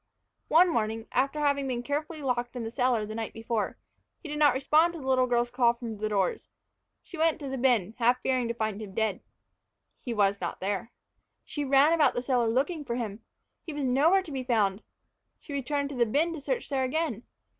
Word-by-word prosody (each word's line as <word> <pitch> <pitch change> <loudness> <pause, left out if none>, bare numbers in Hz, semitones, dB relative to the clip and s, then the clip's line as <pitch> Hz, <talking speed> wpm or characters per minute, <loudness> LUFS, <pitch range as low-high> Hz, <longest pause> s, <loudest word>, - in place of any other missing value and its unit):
One 345 +3 +6
morning, 225 0 -1
after 275 +4 0
having 280 -2 +1
been 245 -2 -2
carefully 300 +3 -3
locked 245 -1 -1
in 245 - -4
the 225 - -5
cellar 245 -3 +1
the 215 - -7
night 225 0 -4
before, 225 -1 -2 0.4
he 340 - -11
did 300 0 -3
not 290 -4 +5
respond 310 +5 +3
to 335 - -7
the 270 - -9
little 260 -1 +3
girl's 240 0 +1
call 240 -1 +3
from 230 -3 -6
the 215 0 -1
doors. 195 -3 -1 0.5
She 345 - -10
went 325 -1 +3
down 280 -4 -6
to - - -2
the 255 - -5
bin, 225 -6 +2
half 245 +2 +3
fearing 255 -2 +1
to 235 - -3
find 220 -2 -2
him 200 -3 -9
dead. 220 -4 0 0.8
He 245 - -5
was 200 -3 +1
not 175 - -4
there. 200 +4 -3 0.5
She 295 - -4
ran 280 +3 +5
about 300 -5 +3
the 245 - -2
cellar 250 -3 +1
looking 290 +7 0
for 235 -4 -3
him. 220 -4 -4 0.4
He 325 - -7
was 290 -2 -2
nowhere 310 +10 +4
to 325 - -10
be 265 -2 -3
found. 210 -5 +1 0.6
She 290 - -10
returned 280 +1 -1
to 280 - -6
the 240 -2 +2
bin 315 +9 +1
to 315 - -7
search 480 - -2
there 270 -2 0
again. 260 -4 -1
255 Hz, 220 wpm, -28 LUFS, 225-290 Hz, 0.8 s, One